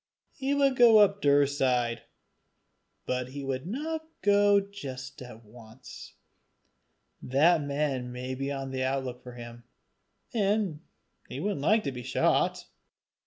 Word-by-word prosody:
He 275 +1 -1
would 275 -2 +2
go 235 -2 +7
up 200 -1 +4
Daurside; 135 -5 +2 1.0
but 125 0 -2
he 140 +1 -7
would 135 +2 -4
not 310 - -4 0.2
go 205 0 +5
just 135 -12 -8
at 120 -3 -11
once; 115 +3 -13 1.1
that 155 +6 +3
man 140 -3 -2
might 125 +1 -6
be 135 +1 -2
on 135 -1 -5
the 130 0 -3
outlook 130 -1 -2
for 125 -1 -11
him, 120 0 -10 0.7
and 205 -7 0 0.5
he 130 - -6
wouldn't 195 -2 -2
like 215 +8 +3
to 140 - -2
be 125 -1 -7
shot. - - +1
140 Hz, 130 wpm, -28 LUFS, 125-200 Hz, 1.1 s, go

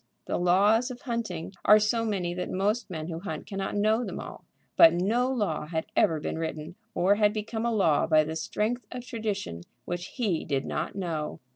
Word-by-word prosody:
The - - -1
laws 205 +7 +4
of 250 -1 -8
hunting 215 - -4
are 210 - +8
so 215 +2 +1
many 190 -6 -1
that 180 0 -4
most 210 +5 0
men 160 -3 -5
who 165 -1 -4
hunt 160 -4 -6
cannot 195 0 -4
know 215 +3 +2
them - - -5
all. - - -9 0.3
But 330 - +8
no 230 +8 +1
law 200 -12 -1
had 160 0 -2
ever 160 -2 +3
been 155 - -4
written, 160 0 -4 0.2
or 185 +3 +4
had 210 -1 +3
become 220 +2 -3
a - - +1
law 170 -9 +3
by 155 -1 +5
the 160 +1 -4
strength 215 +7 -2
of 250 0 -6
tradition, 205 - -4 0.2
which 175 +1 -4
he 205 -10 0
did 140 -2 -1
not - - -3
know. 165 -6 -3
195 Hz, 195 wpm, -28 LUFS, 165-220 Hz, 0.3 s, are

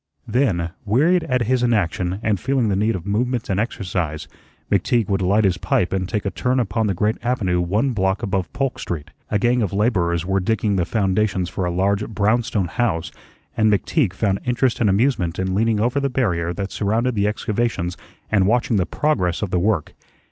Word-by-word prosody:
Then, 90 -11 +1
wearied 150 - +2
at 125 -2 +1
his 125 +2 +1
inaction 95 -5 0
and 105 -4 +1
feeling 130 -2 +1
the 100 - +1
need 110 +3 +1
of 90 -1 -6
movement 115 +2 -1
and 95 - 0
exercise, 90 -8 -3 0.4
McTeague 105 +3 +2
would 100 -1 +1
light 100 +4 +3
his 90 -3 +1
pipe 90 - 0
and 95 -1 -1
take 105 -3 -2
a 100 - -1
turn 125 +8 0
upon 110 -2 0
the 100 - 0
great 105 +5 0
avenue 100 -8 0
one 105 +10 +1
block 95 -1 0
above 95 -5 -1
Polk 135 +1 -2
Street. 80 -4 -5 0.2
A 105 - +1
gang 120 +3 +2
of 100 -4 -1
laborers 90 -6 +1
were 95 +1 +1
digging 105 +1 0
the 90 -3 +1
foundations 95 -2 0
for 95 - -3
a 90 - -1
large 100 +4 0
brownstone 110 -1 +1
house, 90 -4 -1 0.4
and 110 -1 +3
McTeague 105 - +1
found 100 0 0
interest 125 0 +1
and 110 - +4
amusement 100 -5 +1
in 95 0 -1
leaning 110 +2 +1
over 120 +6 +1
the 140 0 0
barrier 90 -10 0
that 100 +2 -4
surrounded 115 +5 0
the 100 -2 +1
excavations 105 -4 -1 0.4
and 95 -2 +3
watching 120 0 +2
the 95 - +1
progress 100 - 0
of 100 - -3
the 90 - +2
work. 100 -4 0
105 Hz, 195 wpm, -21 LUFS, 95-120 Hz, 0.4 s, and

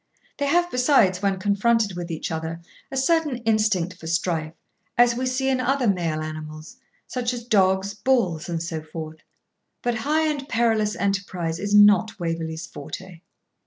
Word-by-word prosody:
They 285 - 0
have 350 +4 +2
besides, 250 -8 +3
when 195 -1 +1
confronted 205 +1 +1
with 175 0 -5
each 165 -1 -4
other, 160 +1 -4 0.3
a 270 - -5
certain 300 -1 +2
instinct 210 -6 +1
for 160 - -9
strife, 165 -1 -1 0.4
as 240 0 +5
we 255 +2 -2
see 260 +1 -1
in 265 -1 +2
other 260 0 +1
male 170 -5 0
animals, 155 +6 -7 0.3
such 250 -1 -2
as 240 - -7
dogs, 195 -3 +2
bulls, 205 -9 0
and 165 -1 -2
so 165 -2 -4
forth. 155 0 -8 0.7
But 240 -1 0
high 310 +5 +1
and 285 -2 -3
perilous 225 -2 +1
enterprise 185 -4 -2
is 205 +2 0
not 210 +1 +5
Waverley's 165 -1 -3
forte. 185 -3 -9
200 Hz, 160 wpm, -24 LUFS, 165-245 Hz, 0.7 s, as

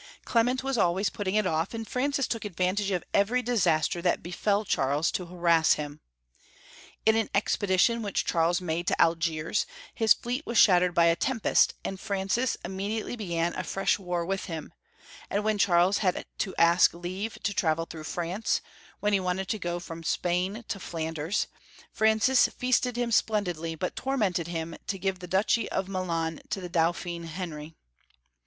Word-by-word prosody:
Clement 250 +3 +2
was 270 -3 -1
al* 175 -3 +3
ways 195 +2 0
putting 200 -1 -2
it 215 -1 +3
off, 165 +4 -1
and 225 -1 -5
Francis 275 +1 0
took 230 - -3
advantage 195 +1 -1
of 180 -4 -1
every 235 +6 +2
disaster 175 -8 +1
that 175 0 +1
befell 200 +4 0
Charles 145 0 +1
to 180 - -3
harass 170 -2 +3
him. 150 0 -6 1.0
In 220 0 +5
an 225 -1 +1
expedition 205 +2 +2
which 205 -3 -1
Charles 170 0 +2
made 170 0 -2
to - - +1
Algiers, 165 - +1 0.3
his 225 -2 +4
fleet 250 +5 -4
was 235 -5 -3
shattered 180 -2 +5
by 170 - +5
a 165 0 +4
tempest, 230 +2 +2
and 195 - -4
Francis 200 +5 -1
immediately 205 +5 -3
began 175 -6 -1
a - - -3
fresh 195 +2 0
war 180 -2 -2
with 195 +2 -2
him; 160 -4 -6 0.6
and 205 +1 0
when 215 -1 0
Charles 180 +1 +4
had 185 -4 0
to 195 - -2
ask 170 +1 +5
leave 185 +5 -5
to 200 - 0
travel 165 -3 +1
through 160 -2 -9
France, 175 +7 -1 0.4
when 210 0 +1
he 200 - +4
wanted 185 +1 -2
to 215 - -1
go 175 -1 -2
from 165 -1 -8
Spain 180 +7 -1
to 195 - -3
Flan 165 -2 -4
ders, 160 +5 -1 0.5
Francis 220 +4 +4
feasted 250 0 0
him 240 -1 -1
splendidly, 180 -7 0
but 180 +3 -3
tormented 205 -11 0
him 165 -1 -4
to 195 - -2
give 190 0 -2
the 180 - -8
duchy 200 +5 +1
of 190 - -2
Milan 170 -4 -2
to - - -2
the 180 -1 -6
Dauphin 170 0 -1
Henry. 160 -2 -6
185 Hz, 175 wpm, -28 LUFS, 170-215 Hz, 1.0 s, In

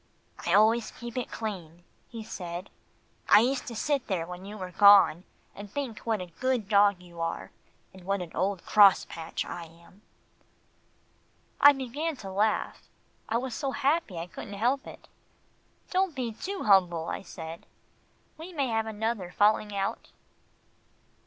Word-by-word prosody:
"I 175 - +4
always 220 +2 +4
keep 240 -1 -9
it 250 -2 -3
clean," 175 -6 -6 0.3
he 230 -2 -7
said. 175 -3 -7 0.6
"I 205 - +8
used 255 +3 0
to 235 - -6
sit 280 +3 -1
there 180 -5 -1
when 180 +2 -9
you 210 +2 -8
were 185 -2 -6
gone 195 -3 +6 0.3
and 205 0 -9
think 265 -5 -4
what 220 -4 -2
a 175 -2 -9
good 255 -5 0
dog 200 -3 +4
you 170 -1 -10
are, 165 0 -4 0.4
and 190 -1 -14
what 195 0 -1
an 170 - -11
old 195 -1 -1
crosspatch 190 -5 +3
I 170 - -7
am." 170 +4 -19 1.6
I 285 - +9
began 285 +5 -3
to 195 -7 -9
laugh. 210 +3 0 0.5
I 225 - +1
was 250 0 -4
so 275 +1 -3
happy 280 - 0
I 165 - -4
couldn't 190 +3 -9
help 250 +6 0
it. - - -12 0.8
"Don't 375 -4 +1
be 250 -3 -2
too 380 - -5
humble," 175 -5 +3
I - - -4
said, 165 -3 -9 0.7
"we 335 +3 -8
may 280 -5 -1
have 225 -1 0
another 220 -3 -3
falling 210 +2 +2
out." 195 0 -3
205 Hz, 155 wpm, -28 LUFS, 180-240 Hz, 1.6 s, I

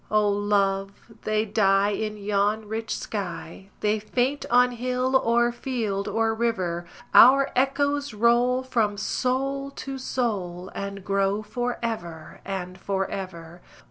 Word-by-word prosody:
O 210 -1 +3
love, 200 0 0
they 215 0 +1
die 200 -1 +3
in 215 +1 -3
yon 205 +1 0
rich 220 +1 -3
sky, 190 -2 -6
They 210 +1 +1
faint 250 +6 -1
on 250 +1 +5
hill 250 +2 -1
or 240 -1 +3
field 225 -6 -3
or 225 0 +1
river: 185 -7 -1 0.3
Our 275 +3 +7
echoes 285 +2 +1
roll 240 +4 +3
from 220 -5 0
soul 270 +5 -1
to 270 -1 -7
soul, 195 -9 -3
And 200 -1 -6
grow 195 +1 +1
for 245 +2 -3
ever 170 -9 -5
and 185 -1 -5
for 195 0 -2
ever. 175 -3 -7
215 Hz, 130 wpm, -25 LUFS, 195-245 Hz, 0.3 s, Our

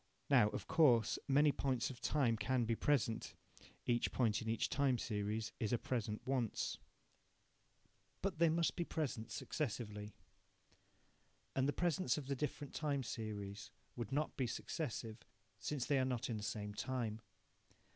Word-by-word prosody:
Now, 120 -6 +7
of - - -5
course, 120 -9 +5
many 145 +2 +5
points 130 -3 0
of 125 - -11
time 130 -7 +3
can 120 +3 +1
be 115 - +1
present 120 -4 +1 0.5
(each 120 -1 +2
point 110 -4 +2
in 115 - -3
each 115 - +1
time 140 -3 +2
series 105 0 -2
is 110 -4 0
a 120 - +3
present 110 -3 -2
once), 130 -5 0 1.4
but 190 -4 -1
they 170 -1 +6
must 165 +1 +2
be 175 - 0
present 130 -9 -2
successively. 105 -7 -3 1.4
And 135 0 +3
the - - +3
presents 175 +3 +1
of 150 - -4
the 140 +1 -1
different 145 0 -3
time 145 -3 0
series 105 -3 -5 0.3
would 120 -3 -4
not 150 +3 0
be 130 - 0
successive, 115 -3 -4 0.4
since 130 +7 -2
they 140 -2 +3
are - - +3
not 125 -2 -1
in 110 - -1
the - - -5
same 105 -1 -3
time. 115 -1 -2
125 Hz, 155 wpm, -38 LUFS, 110-140 Hz, 1.4 s, Now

